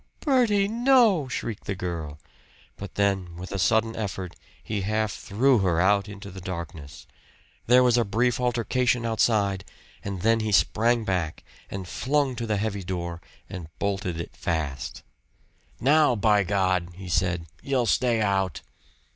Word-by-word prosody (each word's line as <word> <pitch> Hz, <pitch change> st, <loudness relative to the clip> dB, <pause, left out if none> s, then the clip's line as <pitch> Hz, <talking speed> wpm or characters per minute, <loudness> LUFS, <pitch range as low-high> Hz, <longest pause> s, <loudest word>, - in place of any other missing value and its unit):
"Bertie! 235 Hz, -8 st, +3 dB
No!" 230 Hz, -, +4 dB
shrieked 115 Hz, -4 st, -5 dB
the 95 Hz, -, -2 dB
girl; 85 Hz, -5 st, -5 dB, 0.6 s
but 100 Hz, -2 st, -9 dB
then 95 Hz, -4 st, 0 dB
with 90 Hz, +2 st, -8 dB
a 100 Hz, -, -3 dB
sudden 110 Hz, +3 st, +2 dB
effort 95 Hz, -4 st, -4 dB, 0.3 s
he 105 Hz, -2 st, -3 dB
half 110 Hz, +2 st, 0 dB
threw 125 Hz, +4 st, +2 dB
her 90 Hz, -4 st, +1 dB
out 100 Hz, +2 st, +3 dB
into 100 Hz, -1 st, -9 dB
the 95 Hz, +1 st, -9 dB
darkness. 85 Hz, -5 st, -7 dB, 0.6 s
There 125 Hz, +2 st, +6 dB
was 125 Hz, -1 st, +4 dB
a -, -, +3 dB
brief 115 Hz, +4 st, +1 dB
altercation 120 Hz, 0 st, +1 dB
outside, 105 Hz, -4 st, +1 dB, 0.4 s
and 95 Hz, -2 st, -5 dB
then 115 Hz, +1 st, +4 dB
he 110 Hz, -1 st, -2 dB
sprang 115 Hz, +3 st, +3 dB
back, 90 Hz, -5 st, -2 dB, 0.3 s
and 95 Hz, -2 st, -6 dB
flung 135 Hz, +4 st, 0 dB
to 115 Hz, -1 st, -3 dB
the 105 Hz, -1 st, 0 dB
heavy 100 Hz, -1 st, -2 dB
door, 85 Hz, -2 st, -4 dB, 0.3 s
and 90 Hz, -4 st, -7 dB
bolted 95 Hz, -3 st, -2 dB
it 85 Hz, -, -7 dB
fast. 75 Hz, -5 st, -3 dB, 0.8 s
"Now, 145 Hz, 0 st, +4 dB
by 105 Hz, -2 st, +3 dB
God!" 95 Hz, -3 st, +1 dB
he 95 Hz, 0 st, -9 dB
said, 90 Hz, -1 st, 0 dB, 0.2 s
"you'll 135 Hz, -3 st, 0 dB
stay 115 Hz, -1 st, +2 dB
out." 95 Hz, -5 st, 0 dB
100 Hz, 150 wpm, -26 LUFS, 90-120 Hz, 0.8 s, There